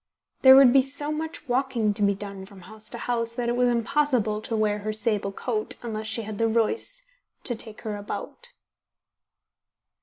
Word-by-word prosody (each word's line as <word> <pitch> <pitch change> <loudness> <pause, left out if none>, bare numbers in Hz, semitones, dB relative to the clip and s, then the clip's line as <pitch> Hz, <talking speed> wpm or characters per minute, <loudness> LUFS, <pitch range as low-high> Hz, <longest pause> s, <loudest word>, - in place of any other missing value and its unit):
There 265 0 +9
would 265 -2 +8
be 270 - +7
so 285 +3 -5
much 320 0 -5
walking 245 -4 +1
to 205 - 0
be 200 -1 +3
done 195 -1 -8
from 195 -2 -14
house 215 +4 -10
to 235 - -4
house, 230 -1 -2
that 240 -1 -1
it 240 - 0
was 245 0 +3
impossible 235 -3 +1
to 225 - -4
wear 210 -1 +1
her 215 +1 -3
sable 215 -2 -1
coat 215 +1 -3
unless 220 -2 -4
she 230 +1 -3
had 215 -1 -7
the 230 - +3
Royce 445 - -1 0.4
to 245 - +1
take 220 -1 -4
her 215 -2 -4
about. 205 - -7
230 Hz, 185 wpm, -25 LUFS, 215-260 Hz, 0.4 s, There